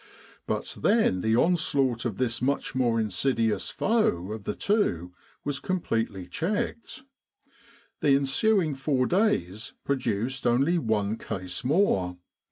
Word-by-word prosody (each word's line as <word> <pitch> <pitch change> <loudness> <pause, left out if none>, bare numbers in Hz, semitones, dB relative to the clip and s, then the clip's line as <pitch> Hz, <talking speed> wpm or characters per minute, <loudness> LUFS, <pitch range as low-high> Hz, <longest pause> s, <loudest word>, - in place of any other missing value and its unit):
But - - -3
then 205 - +3
the 110 +2 +2
onslaught 140 -5 +2
of 110 -5 -2
this 120 -2 -1
much 140 +3 -1
more 120 -3 +1
insidious 110 -1 0
foe 105 - 0
of 110 -2 -6
the - - -2
two 90 - 0 0.3
was 145 -1 -2
completely 115 - -2
checked. 205 - -3 1.0
The 140 -2 +4
ensuing 155 +5 +2
four 135 -1 0
days 115 - 0
produced 125 -1 -1
only 135 +9 +3
one 110 -4 0
case 95 -2 -4
more. 125 - +1
125 Hz, 120 wpm, -27 LUFS, 105-160 Hz, 1.0 s, The